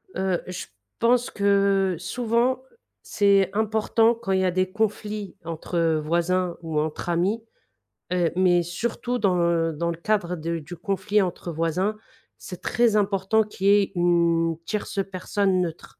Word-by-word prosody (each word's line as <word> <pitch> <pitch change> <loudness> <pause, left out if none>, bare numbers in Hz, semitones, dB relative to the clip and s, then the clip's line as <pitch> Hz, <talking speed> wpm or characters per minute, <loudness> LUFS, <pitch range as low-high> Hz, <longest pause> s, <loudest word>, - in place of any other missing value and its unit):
Heu, 190 -2 0
je 180 0 -5 0.3
pense 245 +1 +3
que 200 -2 +2
souvent 240 +6 0 0.4
c'est 200 -2 +3
important 220 +2 +2
quand 215 -4 -5
il 190 - +2
y - - +2
a 180 - +2
des 185 +1 0
conflits 210 -1 -2
entre 165 +1 -3 0.2
voisins 175 +2 0
ou 160 -2 -2
entre 155 +2 -3
amis, 185 +7 +1 0.7
heu, 175 -2 +1
mais 180 -1 +4
surtout 235 +7 -3
dans, 190 -4 +2
heu, 170 -1 +1
dans 170 +3 -2
le 165 - -6
cadre 180 -1 0
de 165 +1 -3
du 160 +3 -9
conflit 200 +3 0
entre 175 -2 -3
voisins, 165 +6 -1 0.4
c'est 180 -2 -9
très 235 -3 +2
important 205 +1 +2
qu'il 200 -2 -4
y - - +7
ait 195 - -2
une 170 -2 +2
tierce 205 -2 -3
personne 190 0 0
neutre. 165 -2 -6
185 Hz, 155 wpm, -24 LUFS, 170-210 Hz, 0.7 s, y